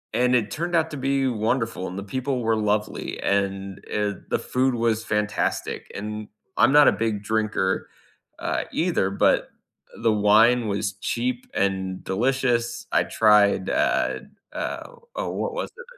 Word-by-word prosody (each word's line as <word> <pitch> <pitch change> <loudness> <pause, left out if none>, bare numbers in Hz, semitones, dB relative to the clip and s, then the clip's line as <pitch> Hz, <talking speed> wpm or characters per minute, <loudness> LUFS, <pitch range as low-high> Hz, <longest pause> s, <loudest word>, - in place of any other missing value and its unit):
and 125 +1 +3
it 110 -4 +1
turned 170 +2 -2
out 160 -1 +2
to 150 - -5
be 135 0 +1
wonderful, 115 -3 -1
and 90 - -7
the - - -6
people 130 +4 -2
were 115 0 +2
lovely, 105 0 -1
and, 100 -1 -1
eh, 105 -1 0 0.2
the - - +2
food 130 0 0
was 115 -1 0
fantastic, 105 -1 -2
and 105 +1 -5 0.3
I'm - - +5
not 145 0 +7
a - - +7
big 110 -2 -2
drinker, 105 -3 0 0.5
uh, - - -2
either, 165 - +1
but 100 - +2 0.5
the 115 - +4
wine 110 +3 +4
was 100 -1 -1
cheap 120 +4 -2
and 95 -1 -1
delicious. 120 +2 0
I - - +4
tried, 105 -3 +4
uh, - - +1 0.3
uh, - - -4 0.3
oh, - - -2
what 485 - -3
was - - -3
it? 485 - -10
110 Hz, 155 wpm, -24 LUFS, 100-125 Hz, 0.5 s, not